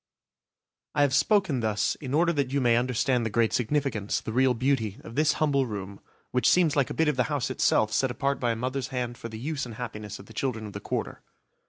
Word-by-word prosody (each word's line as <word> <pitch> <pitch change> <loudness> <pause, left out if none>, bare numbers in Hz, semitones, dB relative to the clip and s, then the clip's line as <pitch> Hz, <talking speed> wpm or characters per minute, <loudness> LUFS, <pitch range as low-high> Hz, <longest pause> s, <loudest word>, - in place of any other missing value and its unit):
I 145 - +4
have 140 -2 +2
spoken 155 - +3
thus 110 -2 0
in 135 -1 -2
order 170 +2 +3
that 140 -4 -1
you 140 - +1
may 120 -3 +3
understand 125 +1 +1
the 115 - -1
great 115 +1 +1
significance, 120 -4 0
the 110 - -6
real 130 0 +3
beauty, 115 -5 0
of 115 - -10
this 150 +3 +3
humble 140 -4 +1
room, 100 -2 -6 0.3
which 125 0 +3
seems 170 -5 +4
like 140 -4 +2
a - - -5
bit 160 - +2
of 150 -3 +1
the 125 - +2
house 140 -4 -1
itself 110 -4 +2
set 135 - +2
apart 140 +2 -1
by 120 - 0
a - - -4
mother's 130 +3 -2
hand 125 -2 -3
for 115 - -6
the 110 - -7
use 145 +4 -3
and 120 -3 -6
happiness 105 -4 -6
of 100 - -12
the 110 - -14
children 110 -1 -2
of 105 - -8
the 100 - -5
Quarter. - - -4
125 Hz, 235 wpm, -27 LUFS, 115-140 Hz, 0.3 s, I